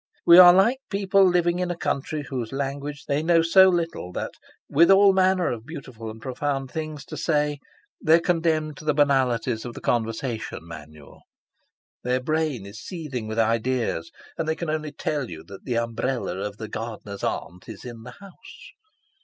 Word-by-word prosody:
We 170 +1 +9
are 175 -1 +11
like 210 +8 +3
people 195 -1 +3
living 175 -1 +2
in 180 -1 -1
a 175 - -3
country 150 -1 -2
whose 125 -5 -5
language 140 +2 -4
they 145 +1 0
know 165 0 +3
so 190 +3 +6
little 165 - -2
that, - - -4 0.4
with 170 +4 +4
all 195 0 +7
manner 185 -1 +2
of 115 -2 -5
beautiful 130 -8 -8
and 110 +1 -9
profound 135 +2 -3
things 155 -2 -5
to 155 - -8
say, 150 -2 0 0.4
they 160 - +6
are - - +4
condemned 160 -4 0
to 155 - -11
the 150 -1 +1
banalities 130 -5 +1
of 120 -1 -7
the - - -7
conversation 115 0 -2
manual. 80 -3 -12 0.8
Their 125 +1 +1
brain 150 -5 -1
is 100 +3 -10
seething 140 - -6
with 110 +1 -5
ideas, 115 -6 0 0.3
and 165 - -1
they 160 - 0
can 165 -1 -3
only 155 -1 -3
tell 145 -3 -3
you 80 -2 -9
that 100 +3 -12
the 120 -2 -1
umbrella 115 +1 -2
of 105 +1 -5
the 110 - -6
gardener's 105 -2 -7
aunt 90 +4 -4
is 110 0 -10
in 120 -2 -8
the 125 +1 -11
house. 200 - -14
140 Hz, 180 wpm, -24 LUFS, 115-165 Hz, 0.8 s, are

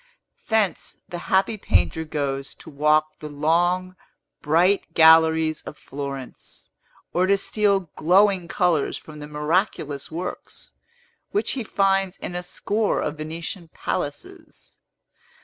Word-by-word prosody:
Thence, 220 -4 0
the 175 - -5
happy 195 +3 +2
painter 160 -4 +1
goes 140 -3 -3
to - - -13
walk 155 +1 +2
the 150 - -7
long, 175 +5 +1 0.5
bright 175 +6 +2
galleries 160 -1 +5
of 150 - -10
Florence, 140 -2 -8 0.4
or 180 +2 +2
to 200 +1 +4
steal 200 -1 +1
glowing 185 +1 +3
colors 175 -4 +1
from 155 -1 -12
the 150 - -8
miraculous 150 -1 -1
works, 175 +3 -7 0.6
which 415 - 0
he 260 - -3
finds 195 -2 +1
in - - -6
a 175 - -3
score 205 +4 -1
of 150 0 -3
Venetian 165 +3 -6
palaces. 145 0 -6
165 Hz, 120 wpm, -23 LUFS, 150-190 Hz, 0.6 s, galleries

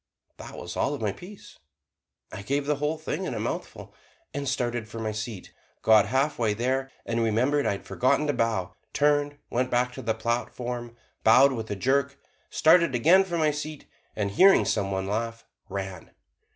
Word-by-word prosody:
That - - -10
was 85 - -7
all 145 - 0
of 140 - -9
the 105 -3 0
piece. 195 - -13 0.7
I - - -7
gave 140 +7 -1
the 150 0 0
whole 150 +2 -1
thing 160 +4 -4
in - - -3
a - - -3
mouthful, - - -5 0.4
and 140 -1 -2
started 120 -4 -2
for 115 - -8
my 110 -1 -2
seat, 110 -2 -6 0.3
got 110 -2 +6
halfway 125 -3 +1
there 130 +4 -1 0.2
and 115 0 -1
remembered 125 +6 +1
I - - +2
had 100 - -8
forgotten 130 +4 +1
to 145 - 0
bow, 110 -8 -1 0.2
turned, 145 0 +2
went 125 +1 0
back 125 0 +1
to 130 - -7
the 115 -2 -1
platform, 120 +1 -3 0.3
bowed 130 +5 +6
with 115 -4 -5
a 100 - -2
jerk, 140 +6 0 0.3
started 155 -1 +4
again 170 +10 +5
for 175 -3 -3
my 155 -2 +3
seat, 150 0 -6 0.3
and 100 -2 -1
hearing 190 - +6
some 100 -3 0
one 95 -1 -2
laugh, 115 +3 -3 0.2
ran. 95 -3 -6
125 Hz, 180 wpm, -26 LUFS, 110-145 Hz, 0.7 s, got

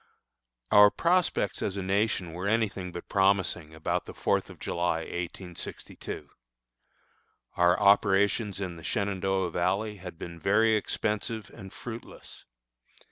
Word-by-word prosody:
Our 105 0 +9
prospects 170 - +1
as 100 -1 -2
a 95 - -2
nation 95 -3 0
were 90 +3 -3
any 110 +1 +3
thing 95 -2 -7
but 85 - -8
promising 95 -5 +1
about 80 - -2
the - - -9
fourth - - 0
of - - -11
July, 85 -1 -1
1862. 90 +1 -7 1.3
Our 90 +2 +4
operations 100 0 +3
in 90 -3 -4
the 80 - -12
Shenandoah 95 +2 -1
Valley 100 +4 0
had 90 -3 -9
been 85 0 -8
very 110 +5 +3
expensive 105 0 -1
and 95 -4 -10
fruitless. 120 +1 -9
95 Hz, 130 wpm, -28 LUFS, 90-105 Hz, 1.3 s, Our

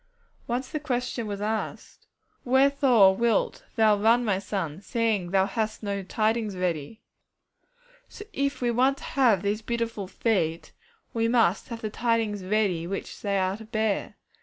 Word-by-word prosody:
Once 245 +2 -2
the 305 - -3
question 245 -5 -2
was 200 -1 -4
asked, 215 +1 -4 0.4
'Wherefore 260 -6 +5
wilt 230 0 0
thou 220 -3 +5
run, 230 +3 +4
my 195 -3 +1
son, 190 -4 -4
seeing 220 -5 0
that - - -9
thou 190 -1 +3
hast 220 +1 -3
no 200 -1 -2
tidings 215 +2 -1
ready?' 180 +3 -3 1.1
So 415 - -10
if 280 -4 -1
we 240 -1 +1
want 260 +4 +2
to - - -13
have 235 -9 +2
these 205 +2 -1
beautiful 230 -3 -3
feet, 175 -6 -1 0.4
we 230 0 +1
must 230 -6 +2
have 230 -2 -7
the 215 - -4
tidings 225 -4 0
ready 185 -4 0
which 195 +2 -6
they 200 -1 0
are 190 +1 0
to 220 - -11
bear. 220 -2 -1
220 Hz, 160 wpm, -26 LUFS, 195-235 Hz, 1.1 s, Wherefore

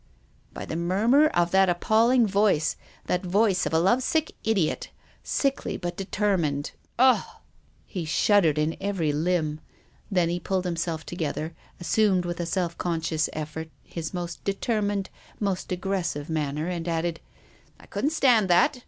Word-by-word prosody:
" - - -35
By - - -7
the - - -5
murmur 210 - +3
of 175 - +1
that 190 -1 +4
appalling 225 +7 +3
voice, 200 -6 +2 0.3
that 180 +2 -1
voice 190 0 +2
of - - -3
a 160 - +3
love 195 +10 +3
sick 315 +4 0
idiot, 200 -8 0 0.3
sickly 275 -1 -1
but 175 -1 -4
determined. 185 -8 -1 0.3
Ugh! 255 +1 +5 0.4
" - - -36
He 180 -4 -5
shuddered 165 -1 +3
in 155 +2 0
every 190 -7 0
limb. 155 -1 0 0.5
Then 180 -4 +2
he 175 +1 -1
pulled 185 +1 -1
himself 165 -2 -2
together, 160 -1 -3 0.3
assumed, 185 +1 +2
with 175 0 -4
a 170 - -2
self 170 -1 -2
conscious 165 -2 -1
effort, 155 +1 -5
his 160 -2 -6
most 175 -2 -5
determined, 205 -1 -1 0.3
most 195 -3 -2
aggressive, 175 -5 -2
man 150 -3 -1
ner, 155 +3 -2
and 175 -2 -3
added: 165 0 -1 0.3
" - - -31
I - - -15
couldn't 290 - -1
stand 250 -9 +4
that. 215 - +4
180 Hz, 160 wpm, -26 LUFS, 165-205 Hz, 0.5 s, Ugh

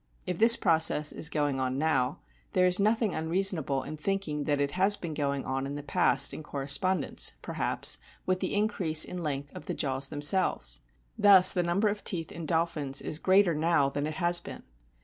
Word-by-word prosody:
If 180 -2 -5
this 230 +1 +10
process 160 -3 +3
is 160 - +2
going 145 -4 -2
on 130 0 -3
now, 135 -4 -1 0.3
there 180 - +2
is 180 +1 +3
nothing 215 0 0
unreasonable 160 -4 -1
in 155 - -8
thinking 155 -4 -4
that 145 -1 -1
it 140 0 -2
has 195 +3 +1
been 170 -3 -7
going 140 -2 -3
on 135 +1 -4
in 140 - -7
the 145 - -8
past 180 +4 +2
in - - -8
corres 140 -2 -1
pondence, 185 -5 -1
perhaps, - - +1 0.3
with 185 0 -1
the - - -4
increase 190 -7 +2
in 180 - -8
length 145 -2 -5
of 150 - -11
the - - -4
jaws 135 -1 -1
themselves. 145 - 0 0.4
Thus 190 -3 +6
the 180 - -1
number 175 +5 -1
of 205 0 -4
teeth 165 -4 -3
in 165 -2 -8
dolphins 155 -5 -2
is 155 - -4
greater 190 -1 +2
now 155 -2 0
than 145 +1 -4
it 155 - -6
has 175 0 +2
been. - - -11
160 Hz, 195 wpm, -27 LUFS, 145-185 Hz, 0.4 s, this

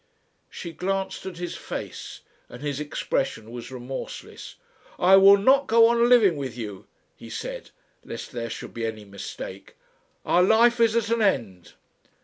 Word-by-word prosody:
She 170 - -7
glanced 190 +3 -3
at 180 -3 -7
his 175 0 -5
face, - - -7 0.3
and 125 +3 -11
his 145 -1 -2
expression 135 -6 -3
was 120 -1 -8
remorseless. 130 +1 -8 0.4
"I 185 +2 +6
will 195 +1 +8
not 265 +7 +4
go 230 0 +6
on 235 0 +3
living 210 -10 +5
with 130 -4 -5
you," 105 -5 -7 0.3
he - - -12
said, - - -6 0.3
lest - - -8
there 115 -1 -4
should - - -7
be 115 -1 -3
any 110 -1 -7
mistake. 100 -1 -9 0.5
"Our 175 - +3
life 230 +5 +4
is 230 -1 +4
at 230 -1 0
an 230 -1 +1
end." 110 - -1
175 Hz, 155 wpm, -25 LUFS, -, 0.5 s, will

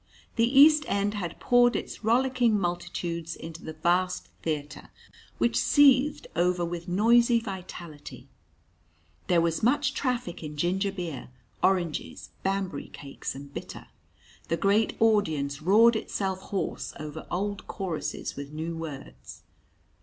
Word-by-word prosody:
The 245 +4 +3
East 305 +1 +8
end 200 +1 0
had 180 -5 -5
poured 245 0 +4
its - - -5
rollicking 240 -1 +2
multitudes 175 -2 -3
into 165 0 -9
the 160 - -6
vast 180 +3 0
theatre, 150 -2 -4 0.5
which 115 0 +1
seethed 290 +1 +4
over 175 +1 +1
with 170 +1 -5
noisy 235 +5 +4
vitality. 180 -7 -8 1.0
There 175 -3 +4
was 165 -1 0
much 270 +4 +2
traffic 250 -10 -2
in 150 -2 -7
ginger 190 +5 0
beer, 175 -10 -6 0.3
oranges, 175 -5 -1
Banbury 195 -6 -2
cakes, 140 -1 -7
and 140 +1 -10
"bitter." - - -8 0.6
The 165 - 0
great 205 +5 +2
audience 160 -11 +1
roared 220 +7 +5
itself 195 -3 -2
hoarse 195 - -3
over 155 +1 -7
old 200 +3 -3
choruses 185 -6 -4
with 140 0 -7
new 160 +2 -4
words. 155 -4 -9
180 Hz, 125 wpm, -27 LUFS, 165-225 Hz, 1.0 s, East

